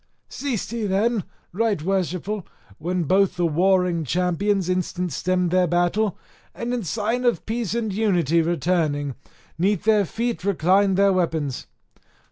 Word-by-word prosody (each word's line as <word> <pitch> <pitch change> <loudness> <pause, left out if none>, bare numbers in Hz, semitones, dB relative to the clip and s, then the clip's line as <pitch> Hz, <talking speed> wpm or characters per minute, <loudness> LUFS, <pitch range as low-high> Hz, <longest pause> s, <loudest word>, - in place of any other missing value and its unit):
Ceased 255 -8 -3
he 230 -3 -2
then, 205 +2 +1 0.3
right 215 -1 +1
worshipful, 190 +3 -2 0.4
when 175 +2 -1
both 190 +3 +2
the 175 -1 0
warring 180 +1 +2
champions 180 +5 0
instant 180 -1 -1
stemmed 180 +2 0
their 180 0 +3
battle, 175 +4 +1 0.4
and 240 +1 -3
in 245 - -1
sign 225 +7 -1
of 240 -2 +1
peace 225 -2 -2
and 220 -4 -1
unity 175 -7 +2
returning, 160 -4 0 0.5
'neath 195 +1 +1
their 210 -2 +4
feet 230 +3 -3
reclined 195 +1 +2
their 200 0 +4
weapons. 160 -7 -1
185 Hz, 135 wpm, -23 LUFS, 175-210 Hz, 0.5 s, their